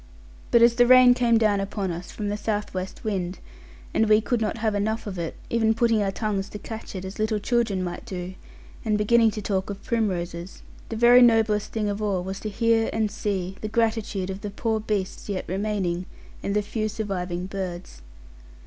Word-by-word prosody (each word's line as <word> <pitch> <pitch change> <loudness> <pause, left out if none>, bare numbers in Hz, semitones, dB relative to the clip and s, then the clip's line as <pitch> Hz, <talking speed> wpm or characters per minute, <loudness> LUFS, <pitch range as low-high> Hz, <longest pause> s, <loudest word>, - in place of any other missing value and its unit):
But 235 -1 +5
as 235 0 +6
the 245 0 +4
rain 255 0 +8
came 240 -2 +3
down 215 -3 +3
upon 195 -1 -2
us 175 +1 -6
from 210 -2 -4
the 205 - -1
southwest 205 -3 -3
wind, 190 -4 -2 0.6
and 220 -1 +2
we 215 0 +6
could 230 +1 -1
not 215 +1 -1
have 220 -1 0
enough 215 +2 -1
of 190 -4 -5
it, 165 -1 -4 0.2
even 225 -1 +2
putting 230 -2 +2
our 200 - +1
tongues 200 -1 -2
to - - -7
catch 220 0 -8
it, 190 0 -5
as 190 +3 -8
little 215 0 +1
children 215 -3 0
might 175 -1 -5
do, 185 -5 -6 0.5
and 215 -2 +1
beginning 225 +2 +4
to 215 -1 -5
talk 190 -1 -1
of 200 -1 -6
primroses; 185 -6 -2 0.3
the 225 - -4
very 240 +2 +7
noblest 220 -3 +4
thing 215 -2 -1
of 205 +1 -2
all 195 -4 0
was 190 +1 -5
to 215 - -4
hear 225 +1 +2
and 220 -2 0
see 195 -3 -3
the 215 - -3
gratitude 220 -4 0
of 190 +1 -7
the 210 - -4
poor 220 +2 -1
beasts 210 -2 -3
yet 195 -2 -2
remaining 190 -2 -2 0.3
and 200 - -2
the 210 - +2
few 215 +1 -2
surviving 185 -5 -3
birds. 185 - -6
210 Hz, 200 wpm, -25 LUFS, 190-225 Hz, 0.6 s, rain